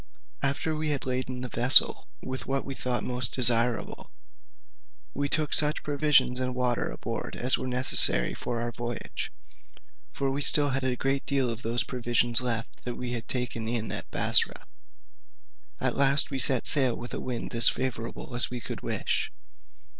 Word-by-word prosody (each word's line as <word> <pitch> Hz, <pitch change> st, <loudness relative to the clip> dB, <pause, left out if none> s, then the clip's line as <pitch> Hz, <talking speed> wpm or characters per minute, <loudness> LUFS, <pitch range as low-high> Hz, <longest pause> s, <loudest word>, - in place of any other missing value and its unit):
After 140 Hz, +3 st, -1 dB
we 155 Hz, 0 st, -2 dB
had 145 Hz, -2 st, -1 dB
laden 130 Hz, 0 st, -3 dB
the 125 Hz, -, -4 dB
vessel 125 Hz, +2 st, +6 dB, 0.2 s
with 130 Hz, 0 st, -6 dB
what 135 Hz, 0 st, -2 dB
we 135 Hz, -, -5 dB
thought 125 Hz, -2 st, -3 dB
most 125 Hz, -1 st, -1 dB
desirable, 120 Hz, -2 st, +1 dB, 1.0 s
we 140 Hz, +1 st, -2 dB
took 155 Hz, 0 st, -1 dB
such 150 Hz, 0 st, +1 dB
provisions 145 Hz, -3 st, +2 dB
and 125 Hz, -1 st, -3 dB
water 125 Hz, -1 st, -1 dB
aboard -, -, -6 dB
as 125 Hz, +1 st, +1 dB
were -, -, -5 dB
necessary 125 Hz, -, +3 dB
for 120 Hz, -1 st, -4 dB
our 120 Hz, 0 st, -3 dB
voyage 120 Hz, -1 st, -5 dB, 0.8 s
(for 135 Hz, -1 st, -2 dB
we 140 Hz, +2 st, -3 dB
had -, -, +2 dB
still 145 Hz, -1 st, +2 dB
a 130 Hz, -1 st, -1 dB
great 135 Hz, +2 st, -2 dB
deal 135 Hz, -4 st, 0 dB
of 115 Hz, +1 st, -7 dB
those 120 Hz, +2 st, -1 dB
provisions 120 Hz, -1 st, +1 dB
left 115 Hz, -2 st, -4 dB
that 120 Hz, -1 st, -5 dB
we 125 Hz, -1 st, -6 dB
had 115 Hz, -2 st, -5 dB
taken 125 Hz, -3 st, -4 dB
in 115 Hz, -1 st, -3 dB
at -, -, -6 dB
Bussorah); -, -, +2 dB, 1.1 s
at -, -, -1 dB
last 140 Hz, +1 st, +4 dB
we 135 Hz, -, -3 dB
set 130 Hz, 0 st, +2 dB
sail 130 Hz, -5 st, +5 dB
with 120 Hz, -, -9 dB
a -, -, -5 dB
wind 125 Hz, -1 st, -5 dB
as 115 Hz, 0 st, +8 dB
favourable 125 Hz, -1 st, -5 dB
as 120 Hz, -, +1 dB
we 125 Hz, -, -6 dB
could -, -, -8 dB
wish. -, -, -2 dB
125 Hz, 170 wpm, -27 LUFS, 120-135 Hz, 1.1 s, as